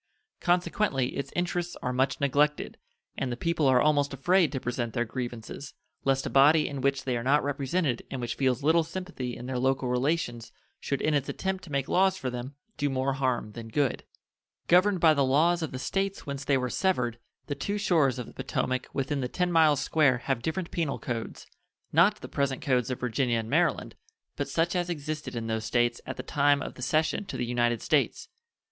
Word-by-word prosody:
Consequently 175 -6 +1
its 140 -1 -4
interests 175 0 -2
are 125 - -1
much 130 +2 +1
neglected, 145 +2 +1 0.4
and 130 -2 -1
the 120 - -3
people 165 0 +1
are 130 -1 +5
almost 145 -1 +2
afraid 175 +3 +3
to 135 - -2
present 120 -2 -3
their 120 -1 +1
grievances, 120 +3 -6 0.3
lest 135 0 +2
a - - -2
body 150 +3 +5
in 140 -2 -5
which 140 +1 +1
they 130 -2 -1
are 120 - -1
not 140 +4 +3
represented 140 -1 -1
and 135 - -4
which 120 -1 -2
feels 130 0 0
little 160 +2 +4
sympathy 165 -7 -5
in 120 - -8
their 130 -1 -2
local 130 0 +1
relations 125 -2 -1 0.3
should 140 - -2
in 155 - +2
its 145 -2 0
attempt 190 -1 -3
to 165 - -11
make 140 -1 -1
laws 190 +1 +3
for 130 -9 -3
them 125 +3 -6 0.2
do 145 - 0
more 135 0 0
harm 130 -5 -1
than 115 +1 -8
good. 135 +3 0 0.6
Governed 185 +2 +4
by 160 -1 +6
the 140 -2 +2
laws 160 +6 +3
of 160 - -3
the 130 - -5
States 195 +8 -2
whence 140 -1 -5
they 140 - +3
were 125 -1 -1
severed, 125 -12 0 0.3
the 145 - -3
two 200 +9 -3
shores 160 -10 +2
of 125 - -4
the - - -13
Potomac 130 0 -2
within 140 0 -1
the 125 - -1
ten 180 +3 0
miles 155 -4 +4
square 145 -5 +3
have 135 -4 0
different 165 +6 -3
penal 160 -5 -1
codes 115 -3 -5 0.5
not 190 +7 +4
the - - -7
present 140 -2 -1
codes 125 -3 +1
of 130 - -3
Virginia 125 0 0
and 115 0 -4
Maryland, - - +1 0.4
but - - -3
such 170 +2 0
as 175 -1 0
existed 155 -4 -4
in 115 -1 -3
those 110 -1 -2
States 120 0 +1
at 130 - -5
the 130 - -5
time 145 +1 +3
of - - -5
the - - -12
cession 155 +9 +1
to - - -6
the 120 - -1
United 120 -1 0
States. - - 0
140 Hz, 205 wpm, -28 LUFS, 125-160 Hz, 0.6 s, by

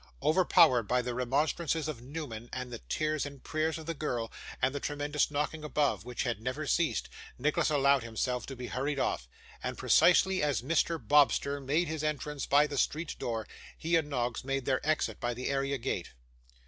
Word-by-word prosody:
Overpowered 155 - +5
by 125 +2 +2
the 125 - -3
remonstrances 150 +5 0
of 145 -7 -5
Newman, 125 -4 -7
and 125 -1 -5
the 120 - -5
tears 155 -1 -1
and 140 -2 -8
prayers 155 0 -1
of 160 - -8
the 165 - -2
girl, 125 -7 -3 0.3
and 130 +1 +1
the 145 - -2
tremendous 145 +1 0
knocking 150 +1 -2
above, 150 -4 0
which 125 -1 -3
had 120 -4 -2
never 130 +6 -3
ceased, 165 +2 +1 0.3
Nicholas 150 +5 +1
allowed 140 -2 +4
himself 115 +2 -2
to 135 - -6
be 125 0 -6
hurried 135 +4 -2
off; 60 - -1 0.3
and, - - -4
precisely 185 +1 +4
as 140 -7 0
Mr. 165 +3 +1
Bobster 140 +2 +3
made 150 +6 +1
his 155 0 -3
entrance 150 -1 -2
by 145 +1 +5
the 145 -2 -2
street 155 +1 -1
door, 115 -2 -3 0.3
he 165 +1 0
and 160 -3 +1
Noggs 125 -3 -2
made 135 -1 -2
their 130 -1 0
exit 155 0 0
by 120 -1 -2
the 125 - -3
area 140 0 0
gate. 115 -8 -3
140 Hz, 185 wpm, -31 LUFS, 125-155 Hz, 0.3 s, Overpowered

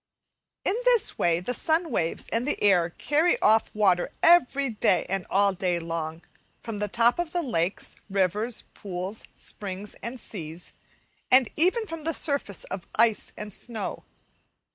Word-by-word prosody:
In - - +3
this 480 -3 +3
way 170 -1 +3
the 215 +8 -3
sun 320 +5 +1
waves 165 0 -1
and 235 +4 -1
the - - -1
air 180 -4 +4
carry 300 - +1
off 220 +1 +4
water 195 -2 +2
everyday, 275 - +4
and 195 -1 -3
all 200 0 +4
day 180 -1 0
long, 165 0 -4 0.4
from 225 -3 -5
the 210 - -1
top 235 - +2
of 345 0 -3
lakes, 205 - -1
rivers, 200 +4 0
pools, 190 +2 -6
springs, 200 0 -5
and 240 +3 -5
seas, 170 -6 -7 0.6
and 255 -2 +5
even 375 +8 +2
from 330 -5 -7
the 330 +1 0
surface 280 - -1
of 190 -2 -7
ice 225 -1 +2
and 210 -1 -6
snow. 225 0 -5
210 Hz, 145 wpm, -26 LUFS, 185-280 Hz, 0.6 s, and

